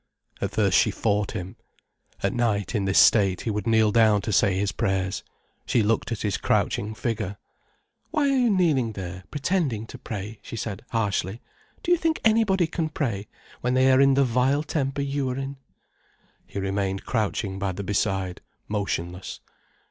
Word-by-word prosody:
At -, -, 0 dB
first 100 Hz, -4 st, +2 dB
she -, -, +3 dB
fought 105 Hz, -2 st, 0 dB
him. 90 Hz, +1 st, -6 dB, 0.7 s
At -, -, +1 dB
night, 110 Hz, -5 st, 0 dB
in 105 Hz, -4 st, 0 dB
this 95 Hz, 0 st, +1 dB
state, 95 Hz, -4 st, +5 dB
he 115 Hz, -, -2 dB
would 105 Hz, 0 st, -3 dB
kneel 110 Hz, -2 st, +4 dB
down 110 Hz, -2 st, +4 dB
to 110 Hz, -, -3 dB
say 95 Hz, -1 st, +3 dB
his 100 Hz, 0 st, 0 dB
prayers. 95 Hz, 0 st, -1 dB, 0.4 s
She 115 Hz, -, +3 dB
looked 115 Hz, +2 st, 0 dB
at 115 Hz, -, -3 dB
his 105 Hz, -3 st, 0 dB
crouching 105 Hz, +2 st, 0 dB
figure. 105 Hz, -4 st, -3 dB, 0.7 s
"Why 305 Hz, -3 st, +1 dB
are 275 Hz, -1 st, +3 dB
you 250 Hz, -2 st, +3 dB
kneeling 155 Hz, -, +2 dB
there, 95 Hz, -1 st, -7 dB
pretending 145 Hz, -, -1 dB
to 125 Hz, -, -11 dB
pray?" 105 Hz, -3 st, -6 dB
she -, -, -8 dB
said, 105 Hz, -3 st, -5 dB
harshly. 105 Hz, -2 st, -1 dB, 0.4 s
"Do 350 Hz, -, 0 dB
you 350 Hz, -, +5 dB
think 325 Hz, -1 st, +1 dB
anybody 215 Hz, -5 st, +4 dB
can 160 Hz, 0 st, -2 dB
pray, 115 Hz, -10 st, -2 dB, 0.3 s
when 125 Hz, +1 st, 0 dB
they 130 Hz, +1 st, +5 dB
are 130 Hz, +1 st, +5 dB
in 135 Hz, -1 st, +5 dB
the 140 Hz, -, +4 dB
vile 130 Hz, +4 st, +2 dB
temper 140 Hz, -2 st, -1 dB
you 140 Hz, -1 st, -1 dB
are 125 Hz, -, -3 dB
in?" 135 Hz, 0 st, -4 dB, 0.9 s
He -, -, -8 dB
remained 95 Hz, 0 st, -2 dB
crouching 105 Hz, -3 st, -1 dB
by 100 Hz, -1 st, -1 dB
the 100 Hz, +2 st, -5 dB
beside, 95 Hz, -2 st, -1 dB, 0.3 s
motionless. 95 Hz, -3 st, -3 dB
110 Hz, 175 wpm, -25 LUFS, 100-135 Hz, 0.9 s, state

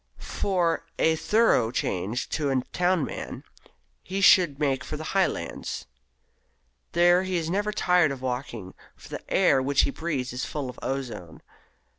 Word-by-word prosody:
For 175 Hz, -4 st, -1 dB
a 160 Hz, 0 st, +3 dB
thorough 210 Hz, -, +3 dB
change 110 Hz, 0 st, -2 dB
to 150 Hz, -3 st, -1 dB
a 135 Hz, -1 st, +2 dB
town 180 Hz, -4 st, +2 dB
man, -, -, -7 dB, 0.6 s
he 190 Hz, +2 st, -4 dB
should 180 Hz, -7 st, +5 dB
make 135 Hz, -3 st, 0 dB
for 150 Hz, -, -5 dB
the 155 Hz, -, -6 dB
Highlands. 195 Hz, -1 st, -1 dB, 1.1 s
There 175 Hz, +1 st, +5 dB
he 185 Hz, -1 st, -1 dB
is 165 Hz, 0 st, -2 dB
never 205 Hz, +3 st, 0 dB
tired 180 Hz, -5 st, +3 dB
of 135 Hz, -, -5 dB
walking, 125 Hz, -6 st, -5 dB, 0.2 s
for -, -, -15 dB
the -, -, -8 dB
air 135 Hz, -, +4 dB
which 140 Hz, +1 st, +3 dB
he -, -, 0 dB
breathes 140 Hz, -6 st, -3 dB
is 125 Hz, 0 st, -3 dB
full 140 Hz, -4 st, -4 dB
of -, -, -15 dB
ozone. 125 Hz, -11 st, -5 dB
150 Hz, 155 wpm, -26 LUFS, 130-180 Hz, 1.1 s, should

